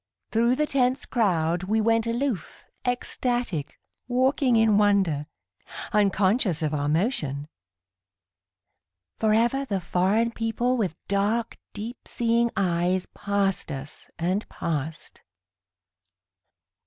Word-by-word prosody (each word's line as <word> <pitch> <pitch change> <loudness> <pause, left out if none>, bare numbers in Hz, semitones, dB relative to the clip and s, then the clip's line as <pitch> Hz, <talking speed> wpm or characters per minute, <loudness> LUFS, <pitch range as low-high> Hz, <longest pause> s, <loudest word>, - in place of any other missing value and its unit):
Thru 235 +2 +3
the 300 +3 +1
tense 260 -2 +1
crowd 175 -6 +1
We 215 +3 +1
went 225 +1 +2
aloof, 235 -3 -2 0.2
ecstatic, 245 - -2 0.3
walking 255 0 +2
in 220 -2 +4
wonder, 190 -8 +2 0.7
Unconscious 200 - +2
of 155 0 0
our 145 -1 0
motion. 150 - 0 1.7
Forever 230 +5 +2
the 200 -8 -2
foreign 190 +6 +1
people 230 +2 0
with 195 -9 -1
dark, 210 +4 0
deep 225 +4 -7
seeing 235 0 +1
eyes 180 0 +1
Passed 200 -4 -1
us 140 +1 -8
and 185 +5 -1
passed. 155 -1 -4
210 Hz, 100 wpm, -26 LUFS, 175-235 Hz, 1.7 s, in